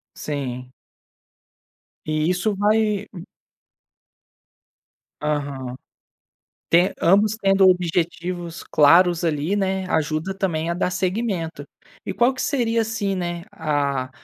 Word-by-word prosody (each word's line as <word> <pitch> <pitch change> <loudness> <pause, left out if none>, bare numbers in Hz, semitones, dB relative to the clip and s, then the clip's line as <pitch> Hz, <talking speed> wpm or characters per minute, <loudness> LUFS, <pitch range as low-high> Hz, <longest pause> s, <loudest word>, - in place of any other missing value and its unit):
Sim. 130 -4 -5 1.4
E 155 +1 0
isso 185 +4 0
vai 210 0 +1 2.1
Aham. 140 -4 -3 1.0
Te 175 +3 +5
ambos 205 +5 +3
tendo 195 0 +4
objetivos 175 -1 -1
claros 170 +3 +4
ali, 160 +4 0
né, 190 -1 -1
ajuda 155 +4 -1
também 170 -4 -2
a - - 0
dar 180 +1 -1
segmento. 185 -4 -2 0.4
E - - -3
qual 245 +2 +3
que 255 - -7
seria 230 -4 +1
assim, 215 -3 -2
né, 175 -1 -3
a 140 -4 -1
175 Hz, 100 wpm, -22 LUFS, 155-195 Hz, 2.1 s, Te